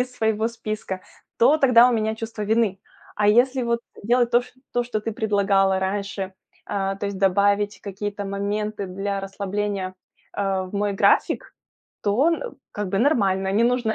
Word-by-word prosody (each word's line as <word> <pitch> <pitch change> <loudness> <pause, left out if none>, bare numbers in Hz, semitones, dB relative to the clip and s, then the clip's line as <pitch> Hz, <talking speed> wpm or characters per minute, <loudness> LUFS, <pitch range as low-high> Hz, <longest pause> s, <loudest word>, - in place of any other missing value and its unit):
из 250 0 -2
своего 220 0 +1
списка, 215 -4 -5 0.4
то 285 +7 +6
тогда 250 -4 +6
у 250 - +1
меня 220 -1 0
чувство 225 -1 -6
вины. 215 -2 +1 0.4
А 210 0 +3
если 250 +4 +4
вот 235 0 0 0.2
делать 240 +1 +3
то 240 +1 +4
ш - - -16 0.2
то 245 - +1
что 230 -3 -2
ты 225 +1 -3
предлагала 200 -3 +2
раньше, 195 0 -3 0.3
а, 195 -1 -2
то 200 - -3
есть 200 -1 -4
добавить 200 +2 +2
какие-то 205 0 -5
моменты 205 +1 -2
для 195 +2 -3
расслабления, 195 -1 -3 0.4
э, 195 -1 0
в - - -11
мой 205 0 0
график, 195 - +2 0.5
то 215 +8 +2
н 340 +9 -2 0.2
как 205 -2 -3
бы 195 - 0
нормально. 195 -7 +2
Не 220 +4 +3
нужно, 240 -2 +1
205 Hz, 170 wpm, -23 LUFS, 195-230 Hz, 0.5 s, то